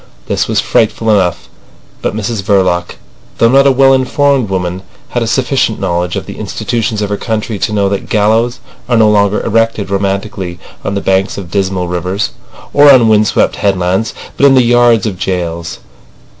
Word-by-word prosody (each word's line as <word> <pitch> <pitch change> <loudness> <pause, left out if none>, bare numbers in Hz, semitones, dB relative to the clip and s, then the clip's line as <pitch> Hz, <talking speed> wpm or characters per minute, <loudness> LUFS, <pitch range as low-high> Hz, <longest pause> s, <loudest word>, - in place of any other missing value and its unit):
This - - -1
was - - 0
frightful 110 0 +1
enough, 90 -4 0 0.5
but - - -2
Mrs 110 0 -3
Verloc, 95 -3 0 0.4
though 115 - +4
not 135 +2 +4
a - - +5
well 135 0 +4
informed 135 -2 +1
woman, 90 -1 -3 0.3
had - - -2
a - - -1
sufficient - - 0
knowledge 85 0 -2
of - - -4
the - - -9
institutions 110 -2 -2
of 100 - -3
her 100 - -1
country 110 -1 -3
to - - -1
know 100 -2 +1
that 100 0 -3
gallows 110 +3 +1 0.3
are 120 - +3
no 110 -1 +5
longer 100 0 +1
erected 115 -3 0
romantically 100 -2 -3 0.3
on 100 - -3
the 100 - -2
banks 95 0 0
of 90 -4 -8
dismal 95 -2 -1
rivers 90 +4 -2 0.4
or 145 0 +7
on 120 -4 +5
wind 105 -1 +3
swept - - +1
headlands, 95 +1 0 0.3
but 140 - +5
in 135 - +4
the 130 - +5
yards 120 -2 +3
of 95 -4 -4
jails. 85 -3 -3
105 Hz, 180 wpm, -12 LUFS, 95-115 Hz, 0.5 s, or